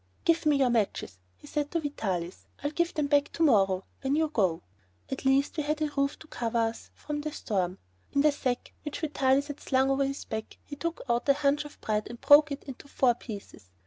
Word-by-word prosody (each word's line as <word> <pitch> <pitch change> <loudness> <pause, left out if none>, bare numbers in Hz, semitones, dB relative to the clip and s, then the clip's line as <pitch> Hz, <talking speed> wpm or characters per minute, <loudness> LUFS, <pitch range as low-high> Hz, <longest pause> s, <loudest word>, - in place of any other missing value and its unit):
"Give 335 -1 +3
me 300 - +5
your 265 -3 +3
matches," 205 - -1 0.2
he 90 - -17
said 295 -1 -2
to 335 - 0
Vitalis. 190 - -3 0.2
"I'll 290 - 0
give 340 +2 +1
you - - -15
them 300 - +1
back 285 0 +2
to 330 - 0
morrow, 195 -9 +4 0.2
when 270 +1 +1
you 315 0 +2
go." 190 - +1 0.5
At 270 - -4
least 275 +4 +3
we - - +1
had 305 +1 -1
a 305 -1 -1
roof 280 0 +1
to 315 - -14
cover 235 -5 -2
us 225 0 -1
from 295 -1 -4
the 305 +1 -4
storm. 185 -8 -2 0.3
In 280 - +2
the 300 +1 +5
sack 255 -4 -3
which 295 -2 -5
Vitalis 275 -3 +2
had 290 -1 -7
slung 265 0 +2
over 275 +1 +2
his 275 +1 -3
back 220 0 -5
he 290 - -8
took 335 +3 -3
out 240 +3 0
a - - +8
hunch 285 +1 +1
of 295 - -12
bread 215 -1 -1
and 235 0 -8
broke 295 +1 +7
it 280 - -5
into 270 0 -10
four 255 -3 +3
pieces. 205 - -10
275 Hz, 230 wpm, -29 LUFS, 230-295 Hz, 0.5 s, a